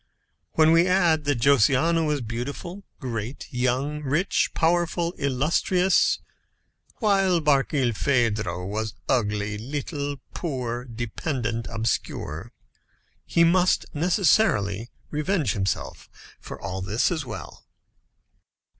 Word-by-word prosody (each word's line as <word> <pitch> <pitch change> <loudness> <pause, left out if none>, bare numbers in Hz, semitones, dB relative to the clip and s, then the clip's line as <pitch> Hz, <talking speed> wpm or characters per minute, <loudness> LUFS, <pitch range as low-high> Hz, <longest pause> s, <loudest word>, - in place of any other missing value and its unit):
When 160 0 +5
we 165 +2 +5
add 170 -5 +3
that 145 -5 0
Josiana 140 +6 +4
was 150 -3 0
beautiful, 140 - -5 0.2
great, 120 -1 -5
young, 130 +4 0
rich, 150 +7 +1
powerful, 170 0 +1
illustrious, 165 +7 +2 0.8
while 195 -5 +2
Barkilphedro 120 - +1
was 110 +3 -3
ugly, 105 -4 0
little, 145 +4 -4
old, 145 -1 -5
poor, 125 -6 -3
dependent, 120 0 -3
obscure, 110 -4 -3 0.8
he 170 - +3
must 180 +2 +3
necessarily 145 - +2 0.2
revenge 150 - 0
himself 95 -1 -3 0.3
for - - -9
all 95 +1 -4
this 105 - +1
as 160 -3 -1
well. 125 -5 -9
140 Hz, 100 wpm, -25 LUFS, 115-165 Hz, 0.8 s, When